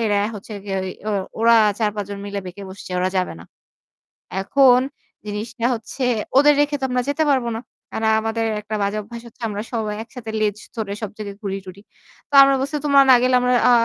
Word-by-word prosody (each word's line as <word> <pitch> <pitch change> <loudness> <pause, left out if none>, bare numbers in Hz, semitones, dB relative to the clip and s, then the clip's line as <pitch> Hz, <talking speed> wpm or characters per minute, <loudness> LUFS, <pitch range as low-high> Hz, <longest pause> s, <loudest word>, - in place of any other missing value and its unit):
এরা 205 -1 +2
হচ্ছে 210 +1 -9
গিয়ে 195 -1 -3
ওই 185 - -4 0.5
ওরা 230 0 +6 0.2
৪-৫ 210 -2 -1
জন 200 - -5
মিলে 200 0 -4
বেঁকে 180 +3 -8
বসছে। 190 0 -10
ওরা 180 +1 +1
যাবে 185 -1 0
না। - - -12 1.0
এখন 250 +4 +5 0.5
জিনিসটা 220 +3 -4
হচ্ছে 235 +3 -5 0.3
ওদের 290 +1 +7
রেখে 290 0 +1
তো - - -4
আমরা 250 0 +1
যেতে 310 +2 +1
পারব 260 -3 +2
না। - - -6 0.3
কারণ 220 0 0
আমাদের 225 +1 -1 0.2
একটা 215 +1 -5
বাজে 200 +1 -1
অভ্যাস 230 +3 -9
হচ্ছে 235 - -18
আমরা 205 0 -4
সবাই 215 -2 -2
একসাথে 230 -1 -8
লেজ 210 -1 0 0.2
ধরে 215 -3 -3
সব 215 - -3
জায়গায় 200 -2 -7
ঘুরি-টুরি। 195 -1 -6 0.5
তো - - -18
আমরা 275 0 +4
বলছি 280 +3 -2
তোমরা 280 -1 +6
না - - +9
গেলে 255 0 +3
আমরা 250 0 +2 0.2
আ - - +6
220 Hz, 195 wpm, -21 LUFS, 200-250 Hz, 1.0 s, না